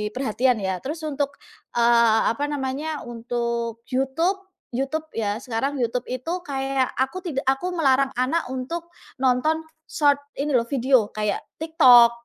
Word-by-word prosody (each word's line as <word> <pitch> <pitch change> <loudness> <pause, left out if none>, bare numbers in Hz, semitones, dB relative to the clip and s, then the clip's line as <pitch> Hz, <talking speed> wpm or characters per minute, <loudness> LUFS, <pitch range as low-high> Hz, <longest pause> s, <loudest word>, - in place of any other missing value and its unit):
perhatian 250 0 +1
ya. 190 -1 -1
Terus 310 +4 -5
untuk, 285 -1 -2 0.4
eee, 235 -2 +5
apa 285 +5 -2
namanya, 290 +2 -3
untuk 235 -1 -3
YouTube. 325 +10 0 0.3
YouTube 275 +5 -2
ya, 210 -2 -1
sekarang 265 +3 -2
YouTube 240 +1 -1
itu 255 +7 -3
kayak 270 -2 -1
aku 265 +8 -1
tidak 275 -6 -3
aku 270 +7 +1
melarang 275 -4 +3
anak 265 +7 0
untuk 295 +7 -4 0.3
nonton 265 +5 +2 0.3
Short 290 -2 +3 0.2
ini 295 +2 -1
loh, 235 -1 +3
video, 255 -3 +3
kayak 210 -1 -1 0.2
TikTok. 255 -8 +7
265 Hz, 135 wpm, -24 LUFS, 235-290 Hz, 0.4 s, TikTok